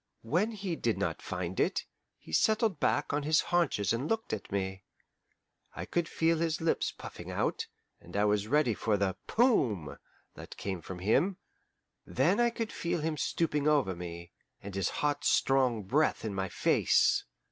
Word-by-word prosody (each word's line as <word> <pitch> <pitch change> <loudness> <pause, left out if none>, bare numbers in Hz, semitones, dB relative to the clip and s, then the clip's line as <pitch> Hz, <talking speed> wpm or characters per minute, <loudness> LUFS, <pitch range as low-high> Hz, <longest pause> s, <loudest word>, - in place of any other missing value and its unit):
When 175 - +1
he 195 -5 -3
did 115 -7 0
not - - -2
find 90 0 -4
it, - - +1 0.3
he 80 - -13
settled 215 - +2
back - - +1
on 145 - +1
his 155 +2 +3
haunches 165 - +1
and 125 +6 -2
looked 225 - -1
at 105 - -5
me. 95 -1 -2 0.9
I - - -5
could 170 -2 -1
feel 165 0 +1
his 165 -1 0
lips 165 0 0
puffing - - -9
out, - - -1 0.3
and - - -8
I 105 - +3
was 105 0 +1
ready 140 -2 +3
for 105 0 0
the 95 -2 0
"Poom!" 115 - +2 0.4
that - - -11
came 95 -3 -4
from 95 - -7
him. 135 - +2 0.7
Then 165 - +1
I 240 0 +4
could 230 -1 -4
feel 170 -1 -2
him 160 0 -1
stooping 150 -2 0
over 140 -11 +2
me, 85 0 -8 0.3
and 100 0 -8
his 95 -1 0 0.2
hot 145 0 0
strong 130 -5 +2
breath 140 +6 +1
in 105 - -2
my 95 -1 -2
face. - - +3
135 Hz, 170 wpm, -31 LUFS, 100-165 Hz, 0.9 s, I